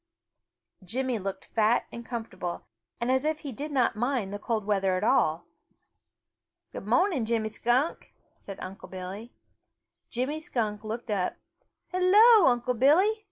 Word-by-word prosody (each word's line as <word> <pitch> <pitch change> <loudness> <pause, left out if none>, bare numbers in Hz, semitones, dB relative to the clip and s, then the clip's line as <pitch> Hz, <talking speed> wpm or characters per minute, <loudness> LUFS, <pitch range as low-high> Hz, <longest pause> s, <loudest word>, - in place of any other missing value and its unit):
Jimmy 245 +4 -2
looked 195 0 -5
fat 225 +1 +2
and 235 - -8
comfortable 225 -7 -5 0.3
and 235 +2 0
as 260 +1 +2
if 310 0 -1
he 285 - -6
did 290 +6 -6
not 255 -4 +2
mind 240 -3 -1
the 205 - -4
cold 215 -1 -2
weather 195 -3 +1
at 185 - -3
all. 160 -5 +2 1.3
"Good 195 - -8
mo'ning, 265 - +2
Jimmy 220 -1 0
Skunk," 245 +8 0 0.2
said 195 -1 -9
Unc' 190 +1 -8
Billy. 190 +5 -7 0.8
Jimmy 265 +5 -2
Skunk 220 -8 -2
looked 225 +1 -5
up. 190 -3 -1 0.6
"Hello, 400 +3 +6
Unc' 245 -1 +1
Billy!" 330 - +5
235 Hz, 140 wpm, -28 LUFS, 210-270 Hz, 1.3 s, Hello